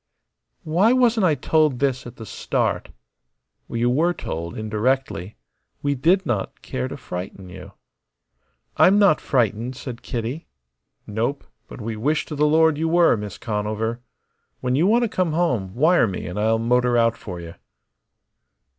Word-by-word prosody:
"Why 180 +9 +3
wasn't 235 -6 +3
I 155 - +3
told 155 -3 +2
this 130 -2 -1
at 120 - -10
the 110 - -9
start?" - - -2 0.8
"You 120 +1 0
were 160 +8 +2
told, 85 - -5
indirectly. 110 -3 -1 0.5
We 145 0 +1
did 175 +8 +2
not 110 -8 -3
care 65 0 -3
to - - -7
frighten 90 +1 -7
you." - - -11 1.0
"I'm 195 +2 +6
not 200 -6 +4
frightened," 120 0 0
said 125 -2 -7
Kitty. 120 +7 -4 0.6
"Nope. 115 +7 -2 0.2
But - - -10
we 110 +1 -4
wish 145 +8 0
to 150 - -6
the 150 +1 +3
Lord 160 0 +4
you 165 - 0
were, 170 -3 +5
Miss 105 -3 -6
Conover. 110 +2 -2 0.6
When 125 0 -1
you 155 +8 +3
want 235 +3 +4
to - - +2
come 185 -6 -1
home, 125 - 0
wire 160 +1 +4
me 95 - -5
and 90 +3 -4
I'll 110 +1 +2
motor 120 +1 +2
out 115 -1 +3
for 90 -6 -8
you." 85 -1 -9
125 Hz, 155 wpm, -22 LUFS, 110-160 Hz, 1.0 s, I'm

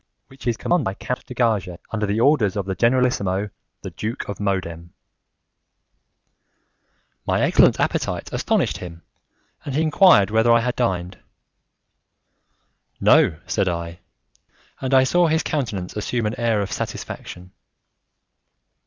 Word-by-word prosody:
which 135 -1 -11
is 115 -1 0
commanded 175 -3 +1
by 95 -3 -3
Count 125 - -5
de 125 - -9
Gages 105 -8 0
under 105 -2 -1
the 105 +2 0
orders 120 -6 +3
of 100 -2 -2
the 95 - -2
generalissimo, 105 -4 +1 0.3
the - - -6
Duke 110 +3 -5
of 100 - -5
Modena." 95 -5 -2 2.4
My - - +1
excellent - - +4
appetite - - -2
astonished - - 0
him, 85 -2 -10 0.6
and 140 - -5
he 155 - +2
enquired 155 - +5
whether 110 +2 +3
I 115 0 +5
had 125 +1 -2
dined. 95 -6 -2 1.8
"No," 75 - +4
said 95 - 0
I; 85 0 -5 0.8
and 130 -1 -3
I 130 -1 +6
saw 175 +6 +3
his 160 0 +1
countenance 105 -12 -3
assume 115 +2 -2
an 105 +3 -3
air 115 -3 +1
of 100 - -6
satisfaction. 90 +1 -6
110 Hz, 135 wpm, -22 LUFS, 95-125 Hz, 2.4 s, I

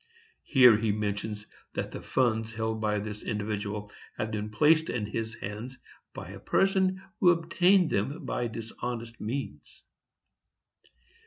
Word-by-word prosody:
[Here 125 -6 +7
he 110 -1 +1
mentions 105 0 -3 0.3
that - - -3
the - - -6
funds 115 -3 0
held 110 0 -2
by 105 -1 +1
this 105 0 -5
individual 105 -1 -3 0.3
had 110 0 -2
been 105 0 -3
placed 155 +8 +4
in 110 -3 -1
his 110 +2 -4
hands 110 +6 -6 0.4
by - - -7
a - - -9
person 190 -1 +2 0.2
who 180 - +6
obtained 175 +2 +4
them 140 - -1
by 120 - -1
dishonest 115 0 -6
means. 130 +6 -5
110 Hz, 135 wpm, -29 LUFS, 105-135 Hz, 0.4 s, Here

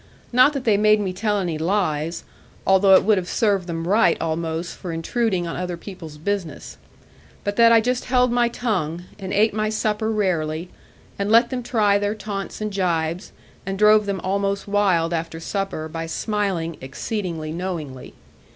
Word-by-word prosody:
Not 255 +4 +6
that 275 -3 -3
they 215 -4 +3
made 215 0 +4
me 190 -3 -2
tell 210 +2 0
any 175 -5 -2
lies, 165 -3 -1 0.4
although 190 0 +6
it - - +5
would 210 -2 +3
have 180 - -7
served 200 -5 +1
them 165 -1 -4
right 200 -3 +4
almost 165 +1 -3
for 180 - -6
intruding 185 +3 -1
on 165 - -4
other 180 -1 -4
people's 165 -4 -10
business; 175 -2 -4 0.7
but 205 0 -2
that 230 0 +7
I 230 -1 +6
just 250 +2 -1
held 250 -1 +2
my 240 -1 +2
tongue, 180 -9 -2 0.2
and 190 -1 -6
ate 210 +2 +3
my 215 0 0
supper 215 0 -1
rarely, 175 -5 -1 0.5
and 200 +1 -1
let 235 +2 +5
them 255 -1 -2
try 215 -4 +2
their 205 +1 -1
taunts 205 -1 -6
and 215 -1 -3
jibes, 170 -2 -1 0.3
and 195 0 -4
drove 210 0 +5
them 195 -1 -1
almost 200 +1 -1
wild 185 -5 +2
after 165 0 -3
supper, 195 -3 -3
by 165 +1 -5
smiling 185 -3 -2
exceeding 160 +2 -4
knowingly. 165 -8 -5
195 Hz, 170 wpm, -22 LUFS, 165-215 Hz, 0.7 s, that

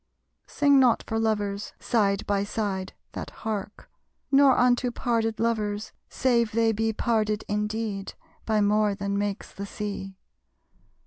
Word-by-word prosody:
Sing 285 -2 +4
not 250 -3 +4
for 225 - -1
lovers, 205 -2 -1
side 205 -4 +1
by 200 -1 +1
side 200 -2 -3 0.2
that - - -6 0.2
hark; 210 -1 -4 0.4
Nor 275 -2 +6
unto 245 0 +3
parted 230 -2 -1
lovers, 215 -2 -1 0.2
save 235 -4 +1
they 225 0 +3
be 225 +1 0
Parted 215 -1 0
indeed 210 -1 -2 0.3
by 215 -1 +1
more 210 0 +2
than 200 0 -2
makes 205 0 -2
the 200 +1 -7
Sea. 200 -2 -5
215 Hz, 130 wpm, -26 LUFS, 205-230 Hz, 0.4 s, Nor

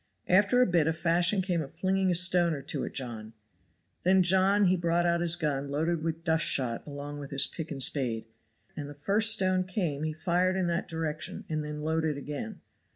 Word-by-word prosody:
After 205 +7 +4
a - - +3
bit 170 -6 +1
a 160 - +1
fashion 170 +4 +2
came 180 -3 -1
up 140 - -7
of - - -20
flinging 190 0 0
a 180 - +2
stone 175 -1 +4
or 140 - -8
two - - -4
at - - -5
John; 115 -4 -6 0.7
then 185 +1 +4
John 190 +3 +4
he 185 0 +3
brought 170 0 0
out 170 0 +1
his 170 -1 +2
gun 145 -5 -2
loaded 160 +3 -1
with 165 0 -4
dust 160 -1 +2
shot 125 -2 -1
along 145 0 -7
with 140 -1 -8
his 140 0 +2
pick 160 -2 -7
and 135 -3 0
spade, 120 -7 0 0.5
and 145 -2 -6
the 145 - -10
first 205 +10 +3
stone 185 -3 +1
came 180 -6 -3
he 155 0 -2
fired 180 +3 0
sharp 190 - 0
in - - 0
that 170 0 -2
direction 160 -1 -5
and 155 -1 -2
then 150 0 -6
loaded 160 -1 -1
again. 140 -5 -7
165 Hz, 220 wpm, -28 LUFS, 145-185 Hz, 0.7 s, After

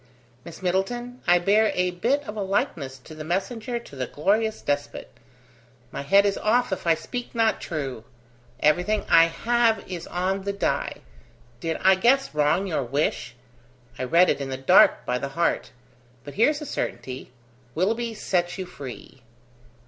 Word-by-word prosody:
"Miss 170 +3 -11
Middleton, 240 +7 -2
I 175 0 +6
bear 210 +5 +3
a 180 0 +1
bit 240 +11 0
of 210 -6 -7
a 210 - -3
likeness 155 -8 -2
to 130 +4 -13
the 155 0 -7
messenger 220 +8 -2
to 235 -11 -11
the 130 -2 -3
glorious 215 - 0
despot 145 0 -3 0.8
my 140 - -5
head 195 +8 +4
is 200 -1 0
off 240 +2 +2
if 180 - -5
I 165 - +5
speak 240 +11 -7
not 225 -1 +2
true! 135 -8 -4 0.6
Everything 180 +8 +2
I 165 0 +7
have 225 +6 +1
is 180 -3 -6
on 185 +2 -1
the 200 +1 -3
die. 200 - -2 0.6
Did 160 +4 -2
I 190 - +6
guess 245 +6 +2
wrong 150 +6 +2
your 165 -7 -1
wish? 135 -1 -2 0.6
I 130 - -1
read 170 +8 +5
it - - -2
in 135 - -4
the 130 - -3
dark, 135 - +5
by 125 0 -1
the 140 - -4
heart. 170 +5 0 0.5
But 145 - -9
here's 290 +9 +2
a - - -5
certainty: 130 - -5 0.4
Willoughby 225 +6 0
sets 175 -4 -1
you 190 - -4
free." 135 -6 -10
180 Hz, 165 wpm, -25 LUFS, 150-220 Hz, 0.8 s, I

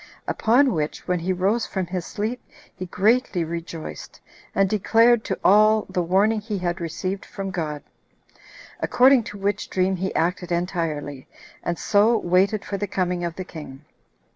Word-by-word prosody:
Upon 250 +3 +3
which, 150 -2 -3
when 180 -1 +1
he 175 +3 -1
rose 195 +6 0
from 190 -2 -2
his 180 -1 -4
sleep, 220 +4 -4 0.3
he 185 -1 -6
greatly 205 0 +2
rejoiced, 165 0 -7 0.4
and 195 0 +3
declared 225 +3 +3
to - - -2
all 215 +2 +5
the 180 - -1
warning 200 +5 +2
he 210 -1 -4
had 175 -1 -2
received 185 +4 -3
from 195 -1 -6
God. 155 -5 -4 1.0
According 255 -1 +4
to 205 - -8
which 200 +1 -2
dream 185 0 +1
he 190 +1 -2
acted 180 +1 -1
entirely, 165 -6 -3 0.3
and 170 -1 -2
so 220 +3 +3
waited 195 +3 +1
for 200 - -3
the 205 - -3
coming 180 -2 -1
of 170 -1 -3
the 185 - -6
king. 150 -4 -10
185 Hz, 160 wpm, -23 LUFS, 175-210 Hz, 1.0 s, all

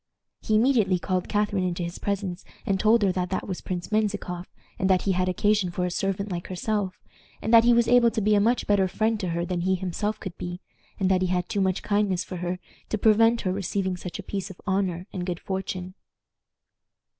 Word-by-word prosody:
He 215 - +1
immediately 220 -5 +3
called 185 +1 -2
Catharine 205 -2 +1
into 175 -1 -1
his 170 0 -5
presence, 195 -3 -3 0.2
and 195 -1 +1
told 220 +1 +4
her 195 - +3
that 180 -1 -2
that 185 - -2
was 185 -3 -4
Prince 180 +1 -5
Menzikoff, 205 -4 -1 0.3
and 190 - +1
that 185 -1 +3
he 195 - +1
had 185 0 +1
occasion 205 +1 +2
for 180 +1 -2
a 180 - -2
servant 195 +2 -2
like 175 -1 -4
herself, 190 +1 -2 0.4
and 220 - -2
that 230 0 +8
he 240 - +6
was 235 -1 +4
able 245 -1 +6
to 225 0 -2
be 210 0 +2
a 205 - +5
much 235 +4 +2
better 200 -2 +3
friend 220 +3 0
to 185 -3 -2
her 170 +1 -1
than 175 -1 -2
he 190 +2 +2
himself 190 +3 -2
could 190 -4 -7
be, 175 0 -5 0.4
and 190 -1 +2
that 185 -1 +3
he 185 - +2
had 180 -1 0
too 200 - -1
much 190 -1 0
kindness 205 -3 +1
for 185 - -7
her 175 +1 -2 0.3
to 215 - 0
prevent 225 +2 +4
her 185 -2 -1
receiving 190 -1 -1
such 180 0 -6
a - - -7
piece 195 -1 -4
of 190 - -11
honor 190 -3 0
and 180 - -3
good 175 -1 -2
fortune. 185 -1 -4
190 Hz, 225 wpm, -26 LUFS, 180-210 Hz, 0.4 s, that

